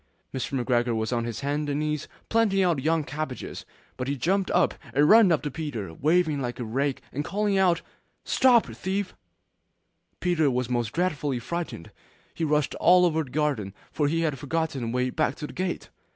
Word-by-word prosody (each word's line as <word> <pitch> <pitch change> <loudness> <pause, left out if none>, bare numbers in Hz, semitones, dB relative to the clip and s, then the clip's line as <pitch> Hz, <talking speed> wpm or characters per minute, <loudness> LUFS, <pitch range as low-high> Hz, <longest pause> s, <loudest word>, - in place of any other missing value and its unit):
Mr. 130 0 -2
McGregor 120 -1 +1
was 110 +2 -1
on 115 -1 0
his 120 +2 -5
hands 145 +1 -1
and 145 0 -1
knees 150 -1 -2 0.2
planting 210 -4 +3
out 170 -7 +1
young 160 +2 +1
cabbages, 145 -1 -5 0.3
but 125 - -3
he 140 - 0
jumped 190 +7 +1
up - - +3 0.2
and 145 +2 +5
ran 215 -2 +7
after 150 -2 0
Peter, 120 - -5
waving 155 - +1
a 120 0 -4
rake 135 +5 -1
and 145 - -2
calling 205 +4 0
out, 180 -3 +3 0.4
'Stop 250 -3 +5
thief!' 185 - -3 1.1
Peter 170 -5 +2
was 125 -1 -1
most 120 -3 0
dreadfully 150 -6 -1
frightened; 160 - -5 0.4
he - - -4
rushed 150 -2 +1
all 180 +1 +6
over 160 -2 +1
the 140 - -12
garden, 130 -9 -1 0.2
for 150 - +1
he 165 +3 0
had 150 -5 -1
forgotten 155 -1 -2
the 115 - -2
way 125 +2 0
back 130 - 0
to 150 - -6
the - - -9
gate. 185 -1 -3
150 Hz, 180 wpm, -26 LUFS, 125-170 Hz, 1.1 s, ran